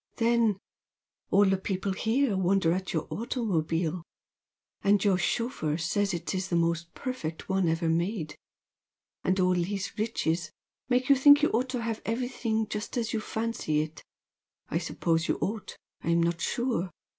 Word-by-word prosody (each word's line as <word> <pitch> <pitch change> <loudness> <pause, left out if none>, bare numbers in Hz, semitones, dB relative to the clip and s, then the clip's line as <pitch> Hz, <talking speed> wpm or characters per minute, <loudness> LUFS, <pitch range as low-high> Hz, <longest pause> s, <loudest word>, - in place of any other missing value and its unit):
Then 230 -3 +3 0.7
all 200 +1 +5
the 195 0 +3
people 190 0 -2
here 225 +3 +1
wonder 190 -2 +2
at 185 +1 -3
your 160 -2 -1
automobile 180 - -1 0.8
and 200 -1 +3
your 195 -3 +3
chauffeur 230 - -1
says 200 +4 0
it 175 0 -3
is 185 0 -2
the 175 - -1
most 170 0 0
perfect 180 - -5
one 190 -3 +2
ever 165 +1 0
made! 170 0 -1 0.9
And 185 +1 +1
all 185 0 +4
these 190 +3 -2
riches 170 -7 0 0.4
make 250 0 +2
you 280 - +7
think 285 +2 +7
you - - +5
ought 250 +3 +1
to 250 -2 -2
have 225 -1 -3
everything 225 -2 -1
just 210 +3 -4
as 235 -1 -1
you 225 - +1
fancy 220 -10 -1
it. 155 +1 -7 0.7
I - - 0
suppose 165 0 0
you - - +1
ought 215 0 -3 0.3
I'm 170 +1 +2
not 170 0 0
sure! 235 -7 0
195 Hz, 155 wpm, -28 LUFS, 170-230 Hz, 0.9 s, you